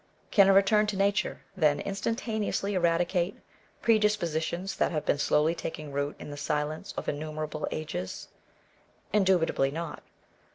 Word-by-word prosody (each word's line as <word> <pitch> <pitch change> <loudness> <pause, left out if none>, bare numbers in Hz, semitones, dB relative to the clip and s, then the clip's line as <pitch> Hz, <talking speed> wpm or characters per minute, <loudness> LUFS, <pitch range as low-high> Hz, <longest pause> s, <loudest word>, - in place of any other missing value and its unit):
Can 200 -3 +6
a - - +7
return 210 +2 +4
to 205 -2 -2
nature, 200 +1 +1
then, 150 -5 +3
instantaneously 210 0 -2
eradicate 175 +1 +1 0.5
predis 215 -2 +4
positions 170 +3 -2
that - - +2
have 155 -3 -2
been 145 - +1
slowly 150 +3 +3
taking 155 -3 -6
root 145 +1 -2
in - - -8
the 145 - -7
silence 150 +1 -2
of - - -4
innumerable 155 +1 -3
ages 95 -12 -5 0.8
1 210 - +4
Indubitably 175 -7 +2
not. 165 +3 -5
170 Hz, 140 wpm, -29 LUFS, 150-195 Hz, 0.8 s, a